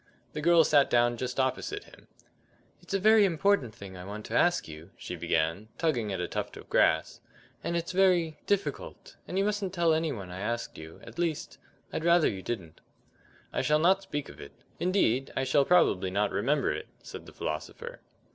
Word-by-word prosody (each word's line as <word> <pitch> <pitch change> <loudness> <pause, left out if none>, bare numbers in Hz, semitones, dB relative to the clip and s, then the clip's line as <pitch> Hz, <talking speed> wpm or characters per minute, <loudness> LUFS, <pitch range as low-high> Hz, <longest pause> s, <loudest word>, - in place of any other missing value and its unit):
The 150 - -4
girl 170 +1 +6
sat 145 -3 +4
down 120 0 +3
just 125 +2 -4
opposite 135 - -1
to - - -18
him. - - -18 0.7
"It's 200 - -4
a - - +2
very 215 +2 +6
important 180 - +1
thing 100 -4 -10
I 90 - -8
want 105 +3 -7
to - - -7
ask 175 0 +2
you," 80 +2 -10
she 90 - -6
began, 85 +4 -1
tugging 125 -11 0
at 95 - -3
a 90 - -2
tuft - - -4
of - - -12
grass, - - +2 0.4
"and 170 - -1
it's 170 +2 -3
very 180 -5 +2
difficult, 205 - -3
and 185 - -4
you 195 - +2
mustn't 205 -3 -2
tell 170 -2 +3
any 160 0 0
one 100 -8 -7
I 90 - -7
asked 115 +3 -3
you; 80 +1 -11
at - - -11
least, 165 -3 -2 0.3
I'd - - -2
rather 170 -1 +5
you 95 - -3
didn't." 95 -8 -6 0.7
"I - - 0
shall 150 0 +3
not 185 +5 +3
speak 145 -6 -5
of 70 - -12
it; - - -11 0.3
indeed, 135 - +1
I 135 - +1
shall 135 +2 +3
probably 100 - +3
not 100 +2 0
remember - - +1
it," - - -6 0.2
said - - -9
the - - -11
philosopher. 75 +1 -5
145 Hz, 200 wpm, -29 LUFS, -, 0.7 s, girl